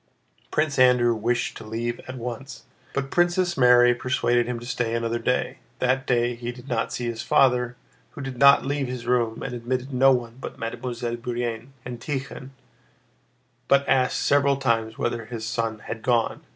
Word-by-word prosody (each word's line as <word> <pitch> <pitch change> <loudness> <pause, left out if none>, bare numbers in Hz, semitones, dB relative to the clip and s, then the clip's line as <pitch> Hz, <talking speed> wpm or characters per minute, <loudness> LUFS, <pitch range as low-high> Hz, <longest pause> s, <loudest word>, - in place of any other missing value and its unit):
Prince 150 -3 0
Andrew 125 -2 +5
wished 120 +2 -1
to - - -9
leave 115 +2 -3
at 130 0 -6
once, 125 +3 -7 0.3
but 135 -1 -3
Princess 175 +1 +2
Mary 125 -1 +6
persuaded 120 -1 +1
him 125 -1 -2
to 120 - -10
stay 120 -2 -1
another 115 0 -1
day. 125 +2 -1 0.2
That 130 +2 0
day 120 -1 +2
he 120 0 -5
did 125 +1 -13
not 115 -3 -1
see 120 - -3
his 115 -1 -3
father, 125 -2 +3 0.4
who - - -8
did 135 -2 -6
not 140 -1 +7
leave 140 -1 -1
his 125 -1 -6
room 120 -2 0
and 125 - -4
admitted 125 +3 -3
no 135 +2 +5
one 120 -1 -2
but - - -7
Mademoiselle 120 +1 -4
Bourienne 120 +1 -4
and 125 -1 -6
Tíkhon, 135 0 -5 1.2
but 140 0 +3
asked 130 -1 +2
several 140 -1 +3
times 115 -4 0
whether 120 -1 -2
his 110 -1 -6
son 115 0 -2
had 115 - -5
gone. 120 -1 +1
125 Hz, 175 wpm, -24 LUFS, 120-130 Hz, 1.2 s, not